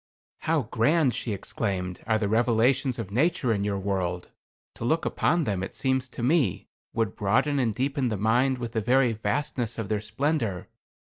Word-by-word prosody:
"How 160 -3 +1
grand," 125 +5 +2
she 115 - -3
exclaimed, 95 -2 -3
"are 110 -1 +3
the 105 -2 -1
revelations 120 +4 +2
of 105 -5 -5
nature 135 - +2
in 100 -1 -1
your 100 -1 -1
world! 95 -2 -2 0.4
To - - -8
look 160 +7 +1
upon 170 +1 +1
them, 100 -7 -1
it 95 - -5
seems 130 -1 0
to 120 - -6
me, 130 - +1 0.2
would 115 -3 -1
broaden 115 +8 +1
and 115 -5 0
deepen 135 0 0
the 110 - -2
mind 120 +6 +2
with 120 -2 -5
the 110 - -1
very 125 +2 +3
vastness 120 0 -2
of 110 -4 -4
their 105 -1 0
splendor. 110 - -1
115 Hz, 180 wpm, -26 LUFS, 105-135 Hz, 0.4 s, are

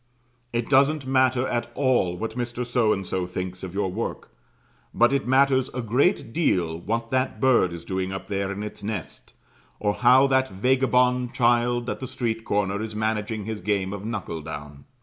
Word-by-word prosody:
It 120 -1 -1
doesn't 140 +1 +3
matter 130 -1 +2
at 120 0 -2
all 125 -10 +1
what 110 +3 -4
Mr. 120 0 -3
So 120 -2 +2
and 95 -2 -1
so 90 0 -2
thinks 90 0 -5
of 95 -1 -7
your 100 -2 0
work; 110 +5 -5 0.6
but 120 +3 +4
it 135 -3 0
matters 130 0 +3
a 125 - -1
great 125 - +1
deal 85 - +1
what 115 +5 -3
that 130 0 0
bird 130 -9 +4
is 85 -1 -8
doing 95 0 -2
up 95 - -5
there 100 -1 -2
in 100 +1 -5
its 105 - -7
nest, 100 -5 -6 0.5
or 105 -1 +1
how 125 +4 +5
that 130 -1 +2
vagabond 125 +3 +2
child 120 0 +2
at - - -3
the 130 - -5
street 115 -3 -3
corner 100 0 0
is 110 -1 -5
managing 110 -1 -2
his 110 -2 -4
game 100 0 -1
of 100 -1 -6
knuckle 105 -7 -4
down. 75 -2 -8
115 Hz, 185 wpm, -25 LUFS, 95-125 Hz, 0.6 s, how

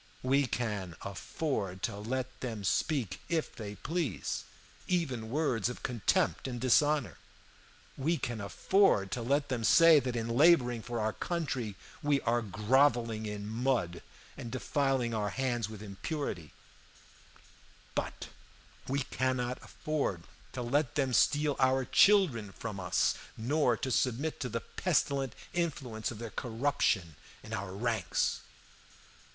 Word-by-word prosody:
We 135 +1 +3
can 105 -9 -3
afford 100 - -3
to - - -1
let 130 +5 -4
them 115 -5 -4
speak, 115 - 0
if 165 -2 -1
they 105 -2 -6
please, 145 - -2 0.4
even 135 -11 -1
words 125 -5 +1
of 125 - -8
contempt 120 0 +1
and 120 -2 -4
dishonor; 130 - +2 0.8
we 160 +5 0
can 120 -5 -3
afford 100 - +2
to 120 - -2
let 140 +4 +1
them 125 -3 -1
say 165 +6 +7
that 125 -2 -3
in 115 -1 -2
laboring 125 -2 +4
for 120 +1 -4
our 110 0 0
country 135 - -3 0.3
we 145 -2 +2
are 120 +1 +1
groveling 115 +1 +2
in 105 0 -5
mud 115 -6 0 0.3
and 115 - -7
defiling 130 -2 0
our 105 -2 0
hands 120 -4 -1
with 110 -1 -8
impurity; 100 - -4 1.4
but - - -4 0.6
we 135 +2 0
cannot 130 -1 -1
afford 140 - -2 0.3
to 125 - -3
let 135 +2 0
them 135 -3 +1
steal 145 +2 +3
our 130 0 +3
children 145 - +4
from 105 -4 -6
us, 90 -1 +2 0.2
nor 125 0 +2
to 130 - -3
submit 130 +6 0
to 125 - -3
the 115 0 -3
pestilent 140 -7 0 0.2
influence 140 -10 -2
of 120 - -7
their 115 0 -6
corruption 115 - 0 0.3
in - - -8
our 95 0 -3
ranks. 110 -3 0
125 Hz, 135 wpm, -31 LUFS, 110-140 Hz, 1.4 s, say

